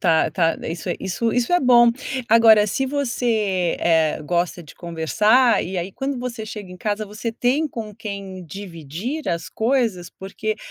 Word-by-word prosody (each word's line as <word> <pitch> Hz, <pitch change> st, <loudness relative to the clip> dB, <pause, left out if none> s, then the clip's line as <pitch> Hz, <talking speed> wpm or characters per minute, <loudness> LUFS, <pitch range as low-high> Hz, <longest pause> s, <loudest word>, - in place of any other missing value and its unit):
Tá, 160 Hz, -3 st, +3 dB
tá, 165 Hz, -1 st, +2 dB
e -, -, -3 dB
isso 170 Hz, -, -7 dB
é -, -, -1 dB
isso. 230 Hz, -, -1 dB, 0.8 s
Agora, 220 Hz, -2 st, +6 dB
se 265 Hz, +7 st, -1 dB
você, 225 Hz, -10 st, 0 dB
eh, 160 Hz, -2 st, +2 dB
gosta 175 Hz, +2 st, -1 dB
de -, -, -14 dB
conversar 210 Hz, +8 st, +2 dB
e 185 Hz, 0 st, -4 dB
aí, 180 Hz, +2 st, -4 dB
quando 270 Hz, -1 st, -3 dB
você 245 Hz, -3 st, -5 dB
chega 210 Hz, -3 st, -8 dB
em -, -, -10 dB
casa, 210 Hz, +2 st, -2 dB
você 215 Hz, +3 st, -4 dB
tem 255 Hz, +7 st, 0 dB
com 220 Hz, -5 st, -7 dB
quem 200 Hz, -3 st, -7 dB
dividir 190 Hz, -, -6 dB
as 170 Hz, -1 st, -2 dB
coisas? 225 Hz, -7 st, 0 dB
Porque, 210 Hz, +3 st, -5 dB
210 Hz, 155 wpm, -22 LUFS, 175-230 Hz, 0.8 s, Agora